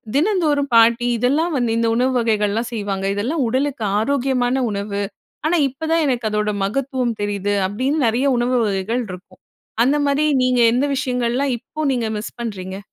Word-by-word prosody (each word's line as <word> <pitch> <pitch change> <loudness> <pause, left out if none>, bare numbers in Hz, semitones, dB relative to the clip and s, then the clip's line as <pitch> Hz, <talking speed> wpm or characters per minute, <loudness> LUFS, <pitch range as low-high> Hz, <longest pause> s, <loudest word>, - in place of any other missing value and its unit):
தினந்தோறும் 300 -4 +1
பாட்டி 230 +1 +5
இதெல்லாம் 290 +8 +1
வந்து 240 -3 0
இந்த 230 0 +1
உணவு 255 +2 +2
வகைகள்லாம் 220 0 0
செய்வாங்க. 200 -3 -3
இதெல்லாம் 260 +9 -1
உடலுக்கு 260 +1 -1 0.2
ஆரோக்கியமான 255 0 0 0.2
உணவு. 200 0 -3 0.5
ஆனா, 345 +2 +2
இப்பதான் 320 +4 -1
எனக்கு 245 -4 0
அதோட 210 0 0
மகத்துவம் 250 +2 -1
தெரியுது. 205 0 -1
அப்பிடின்னு 260 +8 0
நிறைய 240 +5 +1
உணவு 245 +1 +1
வகைகள் 205 +4 -1
இருக்கும். 185 +1 -11 0.4
அந்தமாரி 285 +2 +2 0.2
நீங்க 250 -1 +2
எந்த 255 +4 +2
விஷயங்கள்லாம் 250 +1 0
இப்போ 310 - -13
நீங்க 240 -3 -1
மிஸ் 210 - -7
பண்ணுறீங்க? 190 -5 -5
245 Hz, 145 wpm, -20 LUFS, 215-275 Hz, 0.5 s, பாட்டி